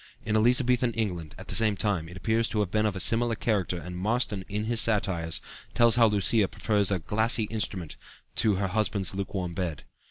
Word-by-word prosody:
In 110 -1 -1
Elizabethan 125 +1 +3
England, 90 -9 -4
at - - -11
the - - -5
same 110 -3 +3
time, 95 -7 -1
it 90 - -10
appears 110 +3 0
to 105 - -1
have 95 -3 -3
been 110 0 +1
of 100 -3 -3
similar 115 +3 +2
character 100 -6 -1
and 90 +2 -8
Marston 105 +1 -1
in 105 +1 -3
his 115 +1 0
satires 90 -7 -1 0.3
tells 120 -1 +6
how 115 -2 +5
Lucea 105 0 +3
prefers 105 -3 0
"a 100 - +1
glassy 110 +6 +1
instrument" 100 -7 -4 0.4
to 105 -3 +3
"her 95 0 -2
husband's 100 -1 0
lukewarm 95 -2 -4
bed." 85 -4 -4
105 Hz, 190 wpm, -27 LUFS, 95-115 Hz, 0.4 s, tells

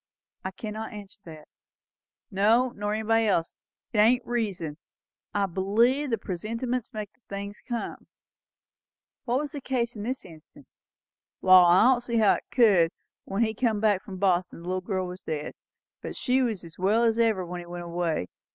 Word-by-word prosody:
"I 190 - -2
cannot 215 +3 -6
answer 205 -1 -10
that." 155 -2 -11 0.8
"No, 220 +6 +3
nor 205 -2 -3
nobody 225 +1 +2
else. 170 -5 +1 0.4
It 210 - +1
ain't 240 +3 +4
reason. 200 -11 -2 0.5
I 205 -1 +1
believe 225 +10 +2
the 230 - +1
presentiments 230 +6 -3
makes 215 -1 -6
the - - -37
things 200 +1 -6
come." 240 -2 -5 1.2
"Was 270 +5 0
that 300 - -6
the - - -6
case 245 -2 -1
in 210 - -6
this 255 +5 -3
instance?" 170 - -17 0.5
"Wall, 185 -1 +7
I 180 - +6
don't 250 0 +4
see 235 -1 -2
how 215 -3 +5
it - - -4
could. 200 -9 +5 0.4
When 195 +4 0
he 220 -1 0
come 225 -2 0
back 205 -3 +2
from 190 -1 -9
Boston, 180 -3 0
the - - -9
little 185 0 -1
girl 185 -1 -2
was 180 +1 -8
dead; 150 -1 -4 0.5
but - - -6
she 255 +1 +1
was 225 -7 -1
as 165 0 -12
well 210 +5 +3
as 230 0 +2
ever 220 -5 +2
when 175 +1 -6
he 175 - -9
went 175 0 -6
away. 170 - -1
210 Hz, 180 wpm, -27 LUFS, 185-235 Hz, 1.2 s, Wall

